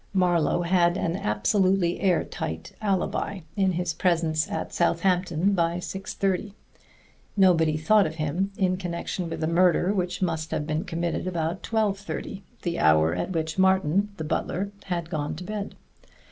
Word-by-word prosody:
Marlowe 175 -2 +2
had 175 0 +3
an 170 -3 -1
absolutely 185 - +1
air 185 -4 +2
tight 80 0 -5
alibi 200 -1 -1
in 190 -3 +2
his 175 -1 -1
presence 165 -3 +1
at - - -4
Southampton 180 +1 +1
by 170 -2 +1
six 190 +2 -6
thirty; 195 +1 -1 0.8
nobody 165 -5 +4
thought 200 +5 +4
of 160 - -7
him 165 +6 -1
in 185 -1 +1
connection 175 -1 -4
with 165 - -4
a - - +1
murder 180 +3 +3
which 180 -2 -2
must 165 -3 -1
have 150 - -2
been 155 +1 -2
committed 170 +2 -2
after 170 0 -2
twelve 215 -3 0
thirty 200 0 -6 0.2
the 170 -1 -2
hour 80 +1 +4
at 90 - -2
which 160 0 -2
Martin, 190 +1 +3
the 160 - -4
butler, 190 +5 -2
had 175 -3 -2
gone 150 -3 -2
to 170 - -7
bed. 205 +1 -5
175 Hz, 160 wpm, -26 LUFS, 160-190 Hz, 0.8 s, nobody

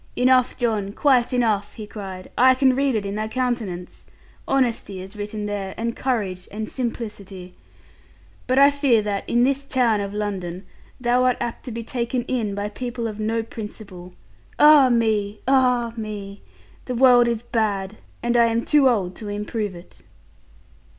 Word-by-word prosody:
'Enough, 255 0 +3
John; 215 -5 -1
quite 255 -2 +3
enough,' 225 -5 0
he 215 - -7
cried, 190 -3 -8
'I 260 +1 +5
can 260 -1 +3
read 275 -2 +1
it 210 -2 -1
in 200 - -3
thy 215 +1 -2
countenance. 220 -7 -3 0.4
Honesty 235 -7 0
is 190 +3 -9
written 210 0 -5
there, 200 -2 -4
and 230 +1 -2
courage 200 -8 -2
and 215 +1 -5
simplicity. 205 -7 -6 0.9
But 255 0 +1
I 280 +1 +7
fear 275 -6 +2
that, 205 -1 -3
in 240 +1 +3
this 275 +2 +1
town 245 -6 +1
of 200 0 -4
London, 195 -3 -4 0.3
thou 250 +1 +2
art 250 -1 +2
apt 240 -1 -5
to 250 - -6
be 230 +1 -5
taken 240 +1 -2
in 225 -6 -2
by 205 0 -2
people 240 +1 -4
of 215 -1 -7
no 225 +1 -1
principle. 205 -5 -9 0.4
Ah 295 -3 +7
me! 215 -3 0
Ah 250 -3 +3
me! 205 -3 -7 0.4
The 250 - -3
world 245 -1 +6
is 235 -1 -1
bad, 215 -3 -1 0.3
and 240 0 0
I 235 -1 +6
am 230 0 0
too 290 -3 +5
old 190 -7 -1
to 210 - -7
improve 210 -1 -3
it.' 175 +1 -14
225 Hz, 165 wpm, -22 LUFS, 205-250 Hz, 0.9 s, I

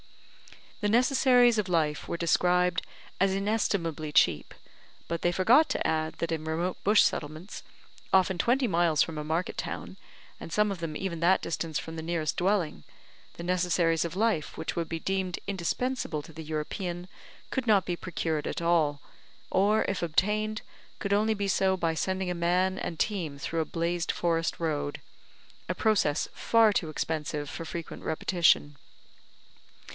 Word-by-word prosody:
The 210 - +1
necessaries 245 0 +4
of 200 -3 -2
life 155 -4 0
were - - -3
described 180 +1 +2 0.4
as 195 0 +3
inestimably 195 -7 -1
cheap; 85 - +2 0.5
but 170 0 -3
they 175 - +2
forgot 235 - +4
to - - -1
add 155 0 0
that 170 - -3
in 160 -1 -2
remote 165 +3 -2
bush 210 +2 +6
settlements, 155 +6 -3 0.5
often 190 -1 +3
twenty 250 +5 +2
miles 170 -5 +3
from 155 -2 -5
a - - -3
market 160 +4 -2
town, - - -5 0.4
and - - -9
some 210 +3 +2
of 195 - -5
them 165 -2 -4
even 180 -4 -3
that 175 +3 +3
distance 165 -2 -2
from 160 +2 -6
the - - -4
nearest 160 -2 -1
dwelling, 180 - 0 0.5
the 170 - -7
necessaries 175 -2 +1
of 170 0 -4
life 210 -7 0
which - - -4
would 165 -1 -2
be 165 - -3
deemed 190 0 -2
indispensable 200 - -2
to 160 - -13
the 160 - -8
European, 175 +4 -4 0.4
could 260 -3 -2
not 205 -4 +4
be 175 - -1
procured 160 -3 -3
at - - -3
all, 160 -4 +2 0.5
or, 205 +3 +3
if 195 - -2
obtained, 210 +6 0 0.3
could 200 -1 -1
only 215 +2 +2
be 200 -1 -2
so 190 -1 +2
by 165 -2 0
sending 185 +3 -1
a - - 0
man 180 +2 +1
and 165 - -4
team 170 -9 -2
through 165 +4 -3
a - - -1
blazed 170 +1 -1
forest 165 -1 -1
road, 150 -3 -2 0.7
a - - 0
process 205 -10 +2
far 225 -2 +4
too 165 -5 -1
expensive 150 -1 -3
for 165 - -6
frequent 165 0 -6
repetition. 160 -2 +2
175 Hz, 160 wpm, -28 LUFS, 160-195 Hz, 0.7 s, bush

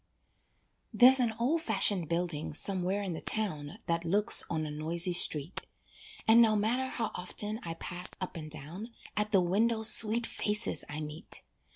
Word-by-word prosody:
There's 260 +2 +7
an 235 -3 0
old 280 +8 0
fashioned 195 - +1
building 170 -3 -4
somewhere 190 +3 -2
in 185 -3 -4
the 160 - -7
town 155 -9 -3
That 170 0 -2
looks 205 +6 +4
on 160 -2 -3
a 150 - -6
noisy 165 +4 0
street, 160 -1 0 0.6
And 225 +1 +6
no 220 -2 +3
matter 235 +5 -1
how 230 -4 -3
often 210 +4 -5
I 165 -1 -7
pass 175 +2 -7
up 185 0 -6
and 155 -2 -8
down, 165 - -9 0.2
At 210 0 -2
the 195 -3 +3
window 220 +6 0
sweet 220 +1 +6
faces 210 0 -2
I 150 +1 -6
meet. 155 +4 -9
190 Hz, 165 wpm, -29 LUFS, 165-220 Hz, 0.6 s, There's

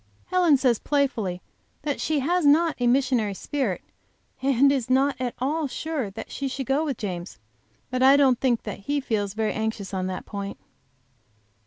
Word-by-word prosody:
Helen 355 -6 +4
says, 255 -4 +2
playfully, 230 -11 -1 0.4
that 290 -2 -2
she 310 -3 0
has 350 +5 +1
not 310 +3 +4
a 245 - +2
missionary 245 -5 +2
spirit, 255 -6 -2 0.6
and 275 +1 +4
is 260 -4 -1
not 270 +1 +3
at 250 -2 -2
all 295 +4 -1
sure 280 -3 -3
that 220 +3 -9
she 275 - -3
shall 265 0 -4
go 270 +4 +1
with 280 -6 -2
James. 180 -4 -5 0.5
But 255 0 -1
I 270 +2 +7
don't 265 -4 +4
think 245 -4 +1
that 210 - -6
he 285 +8 -1
feels 210 -6 -2
very 220 -1 0
anxious 220 -3 -3
on 185 -1 -1
that 185 -1 -5
point! 200 -1 -5
260 Hz, 175 wpm, -25 LUFS, 215-280 Hz, 0.6 s, I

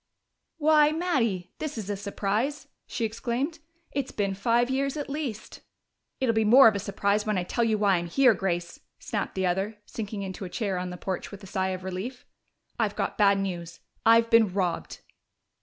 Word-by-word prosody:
"Why, 300 -1 +5
Mattie, 255 - -1
this 305 -5 -4
is 210 -4 -5
a 205 - -1
surprise!" 205 +7 -2 0.2
she 230 - -2
exclaimed. 245 +8 -2 0.3
"It's 280 -2 -2
been 200 -2 -1
five 235 +4 +2
years 275 +2 -1
at 290 -1 -4
least 270 -8 -5 0.3
" - - -53
"It'll 255 -3 +2
be 220 0 +2
more 240 +4 +8
of 220 - +5
a 200 - -2
surprise 200 +2 0
when 210 -2 +1
I 180 - 0
tell 235 +6 -1
you 220 -2 +2
why 200 -3 +3
I'm 170 0 -3
here, 250 +6 +5
Grace," 175 -3 -3 0.2
snapped 205 -3 -4
the 190 -1 0
other, 195 +4 -1
sinking 210 -2 -5
into 190 +1 -6
a 185 - -5
chair 195 -2 -2
on 180 0 -4
the 180 - -7
porch 185 0 -4
with 200 0 -11
a - - -8
sigh 190 0 -1
of 185 -1 -4
relief. 190 +8 -5 0.5
"I've - - 0
got - - -2
bad 200 -2 +4
news. 175 -4 -4 0.2
I've 230 0 +5
been 225 -4 +5
robbed." 180 -2 -2
210 Hz, 195 wpm, -27 LUFS, 190-245 Hz, 0.5 s, more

